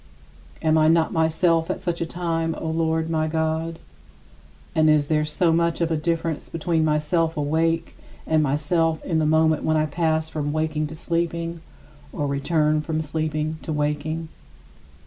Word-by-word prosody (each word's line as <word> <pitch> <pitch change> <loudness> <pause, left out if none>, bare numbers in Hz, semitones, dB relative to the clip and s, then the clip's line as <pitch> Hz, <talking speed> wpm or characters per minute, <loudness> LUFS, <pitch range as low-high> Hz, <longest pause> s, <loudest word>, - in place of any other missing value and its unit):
Am 155 0 +4
I 155 - +4
not 165 0 +3
myself 160 +1 +2
at - - -2
such 170 -1 -3
a 165 - -1
time, 165 -2 -2
O 160 - -4
Lord 160 0 0
my 160 -1 0
God? 160 +1 -1 1.0
And 155 0 +4
is 150 -1 +4
there 150 +1 +1
so 165 +2 +1
much 170 0 +1
of 170 -1 0
a - - +2
difference 165 0 -2
between 165 0 0
myself 155 +2 +1
awake 165 +3 0 0.3
and 160 -1 +2
myself 155 +3 0
in 165 -3 +1
the 155 - +2
moment 160 0 +3
when 155 0 +2
I 155 - +2
pass 160 0 0
from 150 -2 -3
waking 155 0 -1
to 155 - -8
sleeping, 170 0 -2 0.5
or 145 - -2
return 150 +2 +1
from 155 0 -2
sleeping 155 +1 -2
to - - -5
waking? 150 +2 -2
160 Hz, 165 wpm, -23 LUFS, 155-165 Hz, 1.0 s, Am